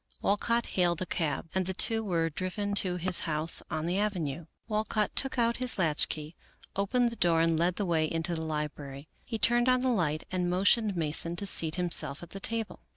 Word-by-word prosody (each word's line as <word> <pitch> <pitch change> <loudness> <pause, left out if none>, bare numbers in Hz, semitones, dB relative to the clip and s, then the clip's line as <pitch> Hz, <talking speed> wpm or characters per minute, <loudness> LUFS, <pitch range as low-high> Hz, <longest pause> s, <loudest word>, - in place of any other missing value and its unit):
Walcott 230 +4 +1
hailed 175 -3 +1
a - - -5
cab, 160 -3 -2
and 190 -1 -1
the 190 - -3
two 225 +3 +3
were 165 -5 0
driven 190 +5 -3
to 185 -3 +2
his 180 0 -1
house 155 +1 +2
on 155 -1 -3
the 180 +3 0
avenue, 170 -7 -2 0.2
Walcott 215 -1 -1
took 270 -1 0
out 235 -1 +2
his 255 -1 -1
latchkey, 155 -2 0 0.4
opened 235 +5 +1
the - - -7
door, 170 -5 +2
and 165 -1 +2
led 175 +1 +1
the 205 - -2
way 160 -3 +1
into 165 +1 -2
the 160 - -2
library. 150 -2 -5
He 225 - -4
turned 240 +3 +3
on 255 0 +3
the 255 0 +1
light 155 -8 0
and 180 -1 -1
motioned 200 +3 +2
Mason 165 +1 +1
to 200 - -3
seat 160 -5 +2
himself 165 -4 +1
at 175 - -11
the 195 - -6
table. 225 +1 -2
180 Hz, 205 wpm, -29 LUFS, 160-210 Hz, 0.4 s, two